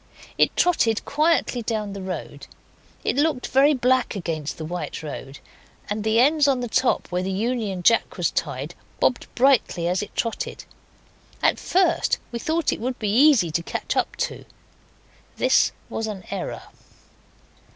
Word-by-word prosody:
It -, -, +2 dB
trotted 235 Hz, -11 st, +2 dB
quietly 305 Hz, -4 st, +1 dB
down 215 Hz, -3 st, -3 dB
the 200 Hz, -, -6 dB
road; 185 Hz, -1 st, -6 dB, 0.6 s
it -, -, 0 dB
looked 290 Hz, -3 st, +1 dB
very 280 Hz, +3 st, +4 dB
black 255 Hz, -1 st, +1 dB
against 160 Hz, -5 st, -4 dB
the 160 Hz, -, -5 dB
white 175 Hz, 0 st, -5 dB
road, 140 Hz, -2 st, -7 dB, 0.5 s
and 210 Hz, 0 st, -2 dB
the 220 Hz, +1 st, +2 dB
ends 290 Hz, +3 st, +4 dB
on 270 Hz, -2 st, +2 dB
the 245 Hz, -, -3 dB
top, 255 Hz, +3 st, +1 dB
where 180 Hz, 0 st, 0 dB
the 185 Hz, -, -3 dB
Union 210 Hz, -3 st, -2 dB
Jack 230 Hz, +3 st, +3 dB
was 175 Hz, -4 st, +1 dB
tied, 140 Hz, +7 st, -3 dB, 0.3 s
bobbed 250 Hz, -, +1 dB
brightly 245 Hz, -9 st, +3 dB
as 180 Hz, +2 st, 0 dB
it 205 Hz, -, -8 dB
trotted. 230 Hz, -2 st, -3 dB, 0.8 s
At -, -, +3 dB
first 355 Hz, -2 st, +2 dB
we 235 Hz, -, -4 dB
thought 320 Hz, +3 st, 0 dB
it -, -, -6 dB
would 250 Hz, +1 st, -2 dB
be 210 Hz, -2 st, -1 dB
easy 255 Hz, -, +5 dB
to 170 Hz, -, 0 dB
catch -, -, -4 dB
up -, -, 0 dB
to -, -, -8 dB
it. -, -, -17 dB, 0.9 s
This -, -, +3 dB, 0.2 s
was 225 Hz, -, -3 dB
an 205 Hz, -3 st, -6 dB
error. -, -, -4 dB
225 Hz, 160 wpm, -23 LUFS, 185-265 Hz, 0.9 s, easy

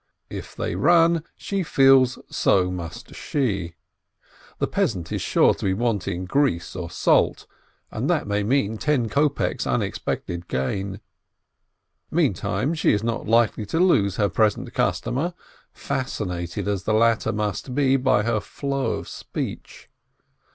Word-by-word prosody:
If -, -, -7 dB
they -, -, -3 dB
run, 165 Hz, -, +4 dB
she 195 Hz, -1 st, -2 dB
feels 135 Hz, -5 st, +4 dB
so 90 Hz, -2 st, +2 dB
must 85 Hz, -3 st, -7 dB
she. 100 Hz, -, -2 dB, 0.8 s
The -, -, +1 dB
peasant 85 Hz, -6 st, -1 dB
is -, -, -2 dB
sure -, -, +4 dB
to -, -, -10 dB
be 95 Hz, -1 st, +1 dB
wanting 100 Hz, -5 st, -1 dB
grease 115 Hz, -, 0 dB
or 90 Hz, -2 st, -5 dB
salt, -, -, +2 dB, 0.5 s
and -, -, -2 dB
that -, -, +1 dB
may 105 Hz, 0 st, 0 dB
mean 110 Hz, -1 st, 0 dB
ten 135 Hz, -7 st, +1 dB
kopeks' 145 Hz, +3 st, 0 dB
unexpected 85 Hz, 0 st, -2 dB
gain. 95 Hz, +10 st, -3 dB, 1.1 s
Meantime 115 Hz, -, 0 dB
she 160 Hz, -, +2 dB
is 105 Hz, 0 st, 0 dB
not 115 Hz, -1 st, -2 dB
likely 115 Hz, -2 st, +2 dB
to 165 Hz, -, -1 dB
lose 105 Hz, -, +3 dB
her 105 Hz, -, +2 dB
present 105 Hz, -1 st, 0 dB
customer, 165 Hz, +8 st, -1 dB, 0.4 s
fascinated 90 Hz, -9 st, -4 dB
as 100 Hz, -3 st, -2 dB
the 110 Hz, -, +2 dB
latter 115 Hz, 0 st, +3 dB
must 105 Hz, +4 st, -3 dB
be 135 Hz, -2 st, +3 dB
by 130 Hz, -5 st, +2 dB
her 115 Hz, -1 st, +1 dB
flow 140 Hz, +5 st, -2 dB
of -, -, -5 dB
speech. -, -, -6 dB
110 Hz, 135 wpm, -23 LUFS, 95-135 Hz, 1.1 s, run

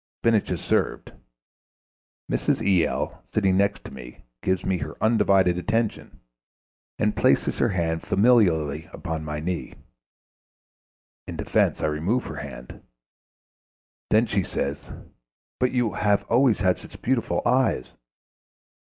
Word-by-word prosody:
Spinach 115 Hz, -2 st, +2 dB
is -, -, -2 dB
served. -, -, -1 dB, 1.2 s
Mrs. -, -, 0 dB
E.L., 95 Hz, -5 st, 0 dB
sitting 95 Hz, -3 st, +2 dB
next 100 Hz, +1 st, +1 dB
to -, -, -9 dB
me, 65 Hz, -2 st, -11 dB, 0.2 s
gives 95 Hz, -1 st, -1 dB
me 95 Hz, -2 st, 0 dB
her 75 Hz, +2 st, -6 dB
undivided 95 Hz, -5 st, +3 dB
attention, 110 Hz, +3 st, -2 dB, 0.8 s
and 105 Hz, 0 st, +1 dB
places 130 Hz, +4 st, +2 dB
her 120 Hz, -, +3 dB
hand 80 Hz, -4 st, -1 dB
familiarly 85 Hz, -, +2 dB
upon 80 Hz, -3 st, -4 dB
my 75 Hz, -1 st, -4 dB
knee. 85 Hz, +3 st, -4 dB, 1.5 s
In -, -, -6 dB
defence -, -, +1 dB
I -, -, 0 dB
remove 80 Hz, +11 st, 0 dB
her -, -, -7 dB
hand. 65 Hz, -3 st, -9 dB, 1.3 s
Then 110 Hz, +2 st, +4 dB
she 100 Hz, -4 st, 0 dB
says: 70 Hz, -3 st, -4 dB, 0.7 s
'But 125 Hz, 0 st, +2 dB
you 125 Hz, -4 st, +1 dB
have 105 Hz, -1 st, +1 dB
always 120 Hz, -3 st, +4 dB
had 90 Hz, -2 st, +2 dB
such -, -, -13 dB
beautiful 125 Hz, -1 st, 0 dB
eyes.'.... 125 Hz, -, +1 dB
95 Hz, 125 wpm, -24 LUFS, 80-115 Hz, 1.5 s, Then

